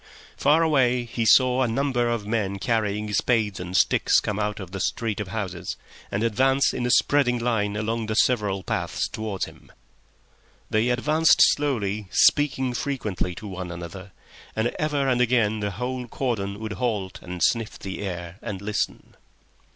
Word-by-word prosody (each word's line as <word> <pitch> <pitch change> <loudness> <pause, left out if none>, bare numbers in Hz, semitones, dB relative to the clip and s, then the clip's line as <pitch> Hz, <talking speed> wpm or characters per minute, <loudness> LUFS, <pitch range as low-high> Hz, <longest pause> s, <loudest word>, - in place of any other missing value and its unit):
Far 160 +3 +3
away 125 -6 +2
he 115 -1 -2
saw 130 +1 +5
a 130 - +2
number 120 0 0
of 115 -3 -2
men 105 -3 -1
carrying 105 -1 -1
spades 110 -4 +1
and 90 +1 -2
sticks - - +4
come 105 0 -3
out 105 0 -2
of 95 -3 -8
the 95 - -5
street 110 +2 -2
of 105 - -3
houses 95 -3 -4 0.3
and 100 +3 -1
advance 130 +5 +2
in 125 -1 -1
a - - -1
spreading 125 -1 +3
line 110 -4 0
along 110 +1 -2
the 110 - -2
several 105 -6 +2
paths - - -2
towards 110 -3 -3
him. - - -16 1.0
They 110 +3 +2
advanced 150 +6 +3
slowly, 110 -8 -2
speaking 130 +1 +3
frequently 110 -10 -3
to 105 - -8
one 95 -2 -6
another, 90 +3 -8 0.4
and 110 +2 0
ever 150 -3 0
and 125 -2 +2
again 115 -3 +2
the 105 -1 -1
whole 125 +5 -4
cordon 105 -6 -3
would 110 -1 -4
halt 100 -3 -2
and 90 -2 -4
sniff 115 -2 +1
the 95 0 -6
air 90 -1 -6
and 105 -5 -5
listen. 105 +1 -3
110 Hz, 165 wpm, -24 LUFS, 100-125 Hz, 1.0 s, saw